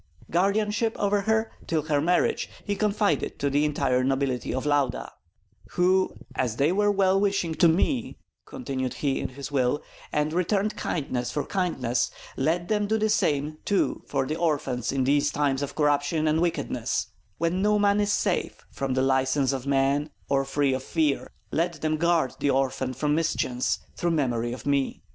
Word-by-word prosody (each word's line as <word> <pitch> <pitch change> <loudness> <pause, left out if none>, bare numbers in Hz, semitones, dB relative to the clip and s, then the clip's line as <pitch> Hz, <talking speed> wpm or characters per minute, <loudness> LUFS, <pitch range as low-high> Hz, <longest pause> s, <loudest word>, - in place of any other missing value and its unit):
Guardianship 210 +5 +1
over 205 0 +1
her 220 +2 +1 0.2
till 160 -2 0
her 145 -2 +1
marriage 175 +3 +1 0.2
he 205 - -1
confided 205 -6 0
to 140 0 -1
the 145 +2 +2
entire 135 -4 +1
nobility 135 -1 0
of 130 - -2
Lauda 145 -4 0 0.6
"who, 185 +1 +2 0.2
as 120 -4 -1
they 140 +6 +2
were 205 +2 +2
well 195 -1 +3
wishing 195 -5 0
to 170 - +4
me," 235 - +1 0.3
continued 130 - -4
he 140 -2 -1
in - - -2
the 140 0 -5
will, 135 +1 +1 0.3
"and 150 +1 0
returned 195 +4 0
kindness 130 -6 -2
for 145 - -2
kindness, 135 -11 0 0.3
let 170 +5 0
them 210 -1 +1
do 220 +2 +1
the 215 0 +1
same 155 -7 0
too 200 - 0
for 135 -2 0
the 155 - -2
orphan 150 -7 0
in 135 -1 0
these 145 +2 +2
times 140 -2 0
of 145 - -4
corruption 150 +1 +1
and 155 +1 +2
wickedness, 175 -1 -1 0.3
when 170 +3 0
no 210 +1 +3
one 205 0 +3
is 205 0 +1
safe - - -1
from 135 -1 -2
the 130 - +2
license 135 +1 +2
of 135 0 -4
men 140 +2 +2 0.2
or 135 0 +2
free 135 0 +1
of 130 - -2
fear; 150 +1 0 0.2
let 170 -1 -1
them 155 0 0
guard 165 -4 +2
the 145 - +1
orphan 130 -1 0
from 145 +4 0
mischance, 140 -6 0 0.2
through 175 - 0
memory 120 -7 0
of 125 - -7
me. 140 -2 0
150 Hz, 175 wpm, -26 LUFS, 135-185 Hz, 0.6 s, to